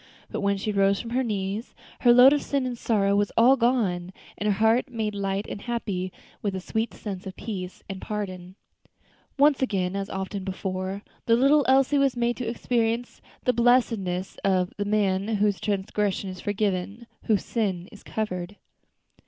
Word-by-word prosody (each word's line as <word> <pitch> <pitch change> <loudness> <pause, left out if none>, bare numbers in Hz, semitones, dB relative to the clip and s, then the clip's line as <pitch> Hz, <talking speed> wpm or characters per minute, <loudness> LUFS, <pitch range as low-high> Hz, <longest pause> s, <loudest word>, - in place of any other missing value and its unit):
But - - -3
when 200 0 +1
she 210 +2 -2
rose 195 -1 +3
from 235 - -6
her 255 +2 +1
knees, 210 -1 -3 0.2
her 240 - +6
load 250 +3 +8
of 290 - +1
sin 280 -2 -1
and 250 -1 -2
sorrow 200 -4 +1
was 205 0 +1
all 245 +4 +7
gone, 220 -8 +1 0.2
and 210 - -3
her - - +4
heart 225 +6 +3
made 220 -3 -2
light 200 0 -2
and 200 - -6
happy 205 -6 -3 0.3
with 200 -2 -2
a - - -2
sweet 220 +4 -2
sense 195 -2 -6
of 190 - -7
peace 185 -4 -6
and 195 -1 -6
pardon. 185 -3 -5 0.8
Once 285 0 +4
again, 195 -7 0
as 195 0 -3
often 190 +1 -4
before, 190 +1 -4 0.2
the 230 - +6
little 275 +4 +4
Elsie 270 +2 +4
was 275 -3 +2
made 240 0 +1
to 245 -3 -3
experience 235 0 -1 0.2
the 250 - +2
blessedness 230 -7 +1
of 185 -2 +1
"the 205 - -2
man 200 -2 +1
whose 205 -1 +1
transgression 200 -1 -1
is 185 - -9
forgiven, 205 +2 -2 0.2
whose 210 -4 +1
sin 190 -6 -1
is 210 - -13
covered." 200 -3 -4
205 Hz, 175 wpm, -26 LUFS, 190-235 Hz, 0.8 s, load